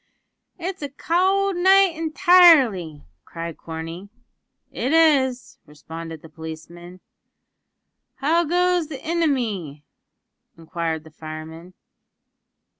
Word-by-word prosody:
"It's 365 +1 -6
a 285 - -4
cowld 375 +6 0
night 380 +1 +5
intirely," 315 - +4 0.2
cried 165 -1 -7
Corney. 165 +4 -8 0.6
"It 265 +5 -2
is," 275 -6 +2
responded 160 +2 -10
the - - -11
policeman. 165 +3 -11 1.1
"How 325 +5 +1
goes 355 0 +1
the 285 -4 -8
inimy?" 230 - -2 0.7
inquired 165 -1 -4
the 160 - -16
fireman. 160 +3 -10
225 Hz, 90 wpm, -22 LUFS, -, 1.1 s, night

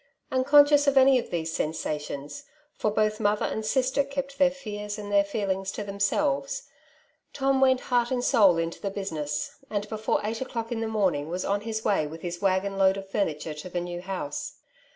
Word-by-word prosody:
Unconscious 290 +2 +5
of 280 -1 +3
any 265 -1 +7
of - - -6
these 165 -2 -2
sensations 150 - -4
— 300 0 -37
for 215 - +1
both 215 0 +1
mother 210 -1 +1
and 220 - -3
sister 260 +4 +1
kept 275 0 -5
their 275 -1 +6
fears 210 -6 -6
and 205 -1 -7
their 200 0 +5
feelings 195 -2 -2
to 210 - -5
themselves 200 -9 0 0.3
— - - -38
Tom 270 -1 +1
went 260 -1 +4
heart 240 -1 +1
and 250 -1 -1
soul 205 -10 +5
into 165 0 -3
the 200 - -2
business^ 155 -7 -3 0.2
and 205 -1 -2
before 220 0 0
eight 225 +3 -3
o'clock 230 -3 -4
in 235 - -1
the 225 - -1
morning 185 -9 0
was 180 +2 -3
on 200 0 0
his 220 0 -4
way 175 -7 +2
with 160 +2 -10
his 175 0 -5
waggon 195 0 +1
load 190 0 +4
of 195 0 -8
fumitare 155 -6 -1
to 150 +4 -8
the 175 - -2
new 175 0 -5
house. 180 -6 -5
205 Hz, 200 wpm, -27 LUFS, 175-250 Hz, 0.3 s, any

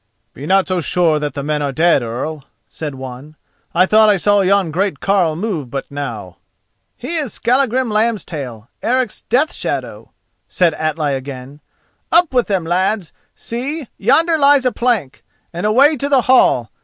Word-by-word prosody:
"Be 140 +4 -8
not 190 +1 +3
so 185 -2 -1
sure 165 -2 +1
that 150 -2 -4
the 140 - -4
men 150 0 -1
are 140 -1 -1
dead, 160 0 +3
Earl," 130 +6 -5 0.2
said 150 -3 -6
one, 130 +3 -9 0.4
"I 180 +2 +3
thought 215 +2 +5
I 205 - +4
saw 205 +2 +2
yon 195 -3 +2
great 185 -2 -1
carle 185 -5 +1
move 170 - -4
but 135 +3 -6
now." 115 -11 -6 0.6
"He 310 +8 -4
is 290 -7 -3
Skallagrim 255 0 +1
Lambstail, 165 - -2
Eric's 250 -2 -1
Death 275 +7 0
shadow," - - -5 0.4
said 175 -3 +1
Atli 155 -2 -1
again. 135 +1 -7 0.5
"Up 340 -3 +4
with 245 -2 +2
them, 190 -4 0
lads—see, 220 - -3
yonder 320 - +3
lies 280 -2 +4
a 250 - +3
plank—and 190 - -3
away 275 +8 +4
to 280 +3 -2
the 275 -3 +4
hall. 235 - +3
185 Hz, 155 wpm, -17 LUFS, 145-240 Hz, 0.6 s, thought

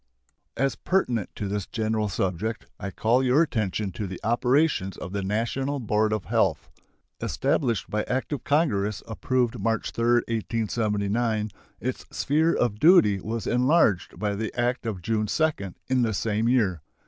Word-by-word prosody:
As 135 +2 +1
pertinent 125 - 0
to 105 - -3
this 100 -1 -3
general 110 -1 -1
subject, 95 +4 -2
I 100 - -4
call 115 +7 +2
your 130 +5 +4
attention 110 - -2
to 100 +2 -4
the 95 0 -7
operations 120 - +1
of 90 - -7
the 100 - -1
National 120 +8 -1
Board 110 -2 +1
of 110 -3 -2
Health. - - 0 0.5
Established 120 - 0
by 105 - -1
act 130 +4 -2
of 145 - -4
Congress 110 - +1
approved 120 +1 -1
March 115 +2 -1
3, 115 - -2 0.2
1879, 110 -1 -1 0.3
its 130 +1 -4
sphere 160 +4 +1
of 105 -4 0
duty 110 - +6
was 110 +2 -4
enlarged 125 - +2
by 105 -1 -1
the 105 +1 -3
act 120 0 0
of 95 -6 -4
June 110 0 0
2 155 +7 +2 0.3
in 130 -1 +2
the 110 -3 +1
same 110 +2 0
year. 100 - +2
110 Hz, 155 wpm, -26 LUFS, 105-125 Hz, 0.5 s, duty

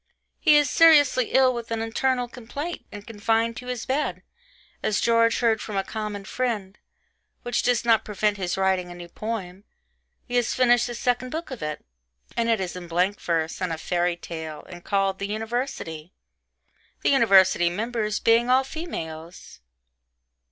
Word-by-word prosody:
He 305 -3 +5
is 295 -1 +3
seriously 290 -6 +5
ill 260 +1 +3
with 235 -1 -6
an 230 -1 -2
internal 245 +2 0
complaint 270 +8 -7
and 205 0 -9
confined 225 +1 0
to 250 - -8
his 250 -2 -4
bed, 285 +3 -2 0.6
as 210 - 0
George 230 0 +3
heard 225 -2 +2
from 210 -2 -5
a 195 - +1
common 210 -1 -5
friend. 210 -5 -3 0.7
Which 245 0 0
does 245 -1 +1
not 225 -2 +4
prevent 210 0 -1
his 180 -2 -2
writing 190 -2 +1
a 175 - -9
new 175 0 -9
poem 200 -3 -5 0.6
he 245 0 -1
has 240 -1 +1
finished 245 -1 +4
the 240 - -5
second 245 +1 -1
book 320 +2 -5
of 255 - -7
it 150 0 -5 0.5
and 230 0 0
it 225 -2 +2
is 185 -2 -4
in 180 -1 -8
blank 180 +4 0
verse 165 0 -1
and 180 -2 -1
a 165 - -2
fairy 175 +1 0
tale, 160 -3 -7
and 175 -1 -11
called 195 -1 0
the 200 - -3
'University,' 215 - -4 0.9
the - - +3
university 190 -8 +5
members 215 +2 -2
being 230 +2 +3
all 260 +1 +5
females. 170 - -7
220 Hz, 165 wpm, -25 LUFS, 185-245 Hz, 0.9 s, He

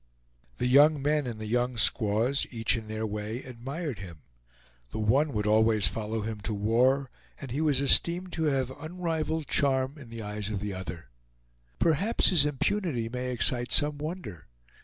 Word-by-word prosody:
The - - -1
young 145 +4 +5
men 145 0 0
and 115 -3 -5
the 110 - -6
young 120 +2 -1
squaws, 110 +4 +3
each 115 -1 0
in 110 -2 -6
their 110 +1 -4
way, 105 +3 -5
admired 130 - -6
him. 85 -5 -11 0.7
The - - -7
one 130 +8 +1
would 105 -1 -2
always 110 -1 +4
follow 110 0 -2
him 105 -1 -5
to 105 - -4
war, 125 +6 +1 0.3
and 135 -4 -8
he 140 +5 -2
was 150 -4 +2
esteemed 175 +6 +3
to 160 - -1
have 135 -3 0
unrivaled 160 -2 -3
charm 135 +1 +1
in 130 -5 -12
the 115 -1 -7
eyes 105 0 -5
of 105 -2 -3
the 105 0 -4
other. 85 -7 -8 0.7
Perhaps 170 +8 +3
his 155 -6 +4
impunity 145 - -2
may 125 +1 -4
excite 120 0 +2
some 145 0 +3
wonder. 150 - -7
125 Hz, 170 wpm, -28 LUFS, 110-150 Hz, 0.7 s, young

